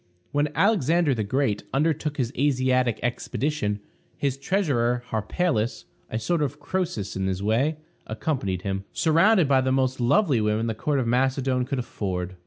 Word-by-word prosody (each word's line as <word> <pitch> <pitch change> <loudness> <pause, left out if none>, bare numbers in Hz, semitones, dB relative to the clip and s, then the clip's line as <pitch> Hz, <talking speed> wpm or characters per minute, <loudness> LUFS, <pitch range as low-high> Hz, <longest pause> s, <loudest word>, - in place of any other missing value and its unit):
When 145 +1 +1
Alexander 170 - +3
the 110 -3 -1
Great 105 -1 0
undertook 150 0 0
his 125 -1 -1
Asiatic 130 -4 +2
expedition, 120 -3 -2 0.4
his 140 -2 0
treasurer, 135 -7 0
Harpalus, 110 - -1 0.2
a 110 - -2
sort 150 +9 0
of 145 0 -2
Croesus 170 - -3
in 95 0 -1
his 95 +1 -2
way, 130 +9 +1 0.3
accompanied 110 - -2
him, 95 -1 -2
surrounded 170 +2 +4
by 135 -1 +4
the 130 0 0
most 130 0 +1
lovely 140 - +3
women 105 +1 +1
the 115 - -1
court 145 +6 -1
of 130 - 0
Macedon 130 +1 +1
could 140 +2 -3
afford. 95 -6 -3
130 Hz, 155 wpm, -25 LUFS, 110-150 Hz, 0.4 s, surrounded